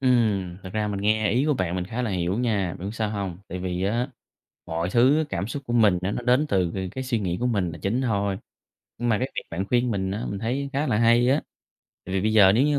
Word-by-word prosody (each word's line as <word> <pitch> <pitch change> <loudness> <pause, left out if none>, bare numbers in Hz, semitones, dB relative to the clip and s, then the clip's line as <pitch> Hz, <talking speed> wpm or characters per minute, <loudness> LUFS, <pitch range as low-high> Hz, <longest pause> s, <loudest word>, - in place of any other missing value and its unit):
Ừm, 110 -9 +2
thật 95 - -7
ra 105 -1 0
mình 100 -1 -3
nghe 110 0 +2
ý 130 +6 +2
của 150 - +3
bạn 90 -6 -1
mình 90 -1 -2
khá 115 +5 -3
là 115 - -1
hiểu 90 +2 -1
nha, 100 -8 0
bạn 95 - -4
biết 110 - -6
sao 110 -2 -1
hông? 100 -4 -3
Tại 90 +1 -5
vì 90 0 -2
á, 120 +6 0 0.6
mọi 85 +2 -2
thứ 135 +7 +4
cảm 95 +4 -2
xúc 140 +4 -5
của 120 - -3
mình 105 -6 +4
á 95 - 0
nó 125 - -3
đến 125 +5 +3
từ 90 - +1
c 95 -1 -4
cái 130 0 -3
suy 120 -3 0
nghĩ 90 -3 -1
của 125 - +1
mình 100 -8 0
là 85 - -8
chính 110 +6 0
thôi, 100 -5 0 0.6
nhưng 120 0 -1
mà 105 - +3
cái 130 +2 -2
việc - - -1
bạn 90 +4 -2
khuyên 125 0 +2
mình 95 -2 -1
á 105 +5 -3
mình 100 - -3
thấy 135 +6 -2
khá 145 +3 0
là 110 -5 +1
hay 115 +1 +4
á, 145 - +3 0.7
tại 95 - -4
vì 95 - +2
bây 110 0 +1
giờ 100 -3 +7
nếu 125 +6 +4
như 145 -1 +2
105 Hz, 275 wpm, -25 LUFS, 95-125 Hz, 0.7 s, giờ